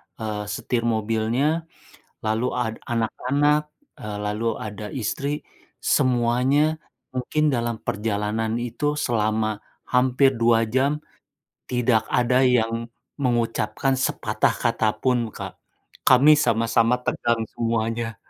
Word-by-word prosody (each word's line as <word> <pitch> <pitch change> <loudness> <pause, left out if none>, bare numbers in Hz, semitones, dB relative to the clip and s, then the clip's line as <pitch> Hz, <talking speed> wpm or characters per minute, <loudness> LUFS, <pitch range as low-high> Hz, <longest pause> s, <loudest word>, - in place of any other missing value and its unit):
eee, 105 -2 -4
setir 115 +3 -2
mobilnya 115 +8 0 0.5
lalu 110 +3 0
a 125 -2 -1 0.2
anak-anak, 145 +6 0 0.2
eee, 105 -1 -6
lalu 105 +2 -2
ada 105 0 -6
istri, 140 +4 -2 0.4
semuanya 130 +5 +2 0.3
mungkin 150 +4 0
dalam 120 -4 -1
perjalanan 110 +2 -1
itu 120 +4 -5 0.2
selama 110 -2 0 0.3
hampir 130 +1 +3
2 115 -1 +3
jam 135 +5 +1 0.7
tidak 125 -2 +2
ada 125 +1 +3
yang 115 -2 +1 0.3
mengucapkan 120 0 0
sepatah 130 - 0
kata 115 -2 +1
pun, 120 -1 +1
Kak, - - -9 0.4
kami 135 +4 +7
sama-sama 115 -3 +2
tegang 115 -1 0
semuanya. 115 0 -1
120 Hz, 100 wpm, -23 LUFS, 110-130 Hz, 0.7 s, kami